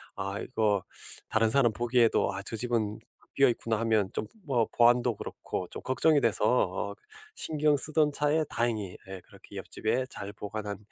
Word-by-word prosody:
아 100 +1 -3
이거 105 -5 0 0.5
다른 110 0 +3
사람 120 -2 +4
보기에도 120 -2 +2
'아 95 - -3
저 115 - 0
집은 110 -3 -1 0.4
비어 135 -1 +5
있구나.' 115 -1 -1
하면 110 -4 +2
좀 - - -2 0.2
뭐 125 -6 +2
보안도 120 0 +4
그렇고 90 - -5
좀 - - -7
걱정이 145 +3 +3
돼서 - - +1
어 - - +1 0.4
신경 150 -1 +1
쓰던 150 +1 +2
차에 150 +2 +1
다행히 110 -6 -1
예 95 -1 -6
그렇게 - - -13
옆집에 120 +4 -1
잘 100 0 -7
보관한 105 -1 -5
115 Hz, 315 characters per minute, -29 LUFS, 105-130 Hz, 0.5 s, 비어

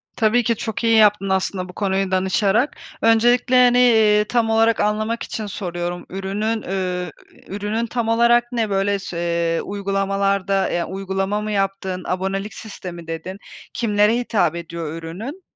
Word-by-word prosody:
Tabii 230 +2 +2
ki, 230 0 +1
çok 220 +2 -4
iyi 230 -1 +4
yaptın 210 -2 +4
aslında 190 -1 -1
bu - - -10
konuyu 195 -1 -1
danışarak. 195 +7 +1 0.3
Öncelikle, 240 +3 +3
hani, 245 0 +4 0.4
ııı, 210 - +2
tam 230 0 +1
olarak 225 0 +3
anlamak 215 +2 0
için 215 - -5
soruyorum. 175 -2 -4
Ürünün, 205 +4 -2
ü 180 -1 -2 0.4
ürünün 210 +4 -2
tam 235 0 -2
olarak 235 +1 +3
ne? 225 -3 -1
Böyle 195 0 +1
se 170 -2 -1
uygulamalarda, 195 -1 0
yani, 175 - -1
uygulama 195 +2 -2
mı 215 0 -4
yaptın? 195 -2 -2
Abonelik 195 +3 -2
sistemi 175 -6 -9
dedin. 165 +4 -6 0.4
Kimlere 215 -1 +2
hitap 200 -9 0
ediyor 165 -2 -5
ürünün? 190 - -7
200 Hz, 145 wpm, -21 LUFS, 185-225 Hz, 0.4 s, iyi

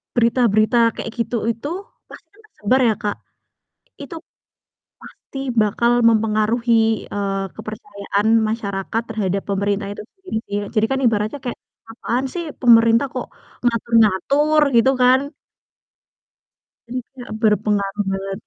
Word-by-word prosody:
berita-berita 235 -1 +3 0.2
kayak - - -5
gitu 235 0 -1
itu, 230 +6 -7 0.4
pasti - - -14 0.2
tersebar 255 - 0
ya 220 - +3
Kak, 205 -1 -2 0.9
itu 305 +4 -8 0.8
pasti 270 - -12 0.2
bakal 235 +3 +1 0.2
mempengaruhi, 225 +1 +1
eee, 195 -1 -2
kepercayaan 205 -1 -4 0.2
masyarakat 215 0 -3
terhadap 200 -3 -2
pemerintah 200 +1 -1
itu - - -8
sendiri 380 - -5
sih. 205 - -1 0.2
Jadi 220 0 +3
kan 270 - 0
ibaratnya 215 +4 0
kayak, 245 - -4 0.4
"Apaan 245 +2 -2
sih 345 - -3 0.2
pemerintah 230 +1 +5
kok 250 - -3 0.4
ngatur-ngatur," 235 +6 +2
gitu 260 +3 +5
kan. 265 +4 +3 1.6
Iya, 250 0 -7 0.2
berpengaruh 210 -2 +1
banget. 195 0 -4
225 Hz, 110 wpm, -20 LUFS, 205-245 Hz, 1.6 s, pemerintah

